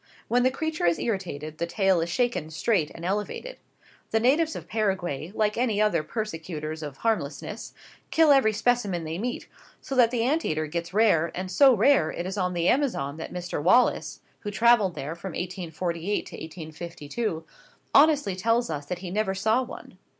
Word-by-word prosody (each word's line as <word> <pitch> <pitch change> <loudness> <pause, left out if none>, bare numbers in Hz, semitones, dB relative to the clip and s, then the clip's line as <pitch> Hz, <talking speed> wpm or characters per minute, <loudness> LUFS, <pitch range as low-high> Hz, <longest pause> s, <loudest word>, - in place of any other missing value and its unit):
When 245 +1 +2
the 255 - +4
creature 310 - -2
is 170 - +3
irritated, 155 -8 -4
the 170 - -1
tail 190 -2 +2
is 165 - -2
shaken 240 -6 0
straight 160 +1 0
and 170 - -7
elevated. 210 - -3 0.5
The 225 - +2
natives 300 +7 +2
of - - -7
Paraguay, 185 -7 -2
like 215 +1 +1
other 210 -7 +2
persecutors 160 -5 -5
of 145 -3 -7
harmlessness, 205 -1 -3 0.3
kill 320 -2 +5
every 270 -6 +5
specimen 210 -5 0
they 160 +2 -4
meet, 245 +3 -3 0.3
so 275 - -7
that 245 -3 +5
the 235 -1 0
ant 300 +7 +1
eater 155 0 -1
gets 170 +2 -4
rare, 190 -6 +3
and 185 +1 -4
so 270 +1 +6
rare 215 - +4
is 185 +4 -4
it - - -3
on 180 0 0
the 170 0 +1
Amazon 230 - +1
that 160 - -7
Mr 180 -3 -4
Wallace, 190 +10 +3 0.2
who 205 - -5
travelled 215 -3 +4
there 150 +4 -4
from 170 +1 -7
1848 175 +1 -3
to - - -9
1852, 160 +3 -5 0.5
honestly 290 -9 +5
tells 230 +1 +1
us 145 -2 -5
he 180 0 -4
never 200 -1 0
saw 220 +6 +2
one. 255 - -9
190 Hz, 170 wpm, -26 LUFS, 165-230 Hz, 0.5 s, so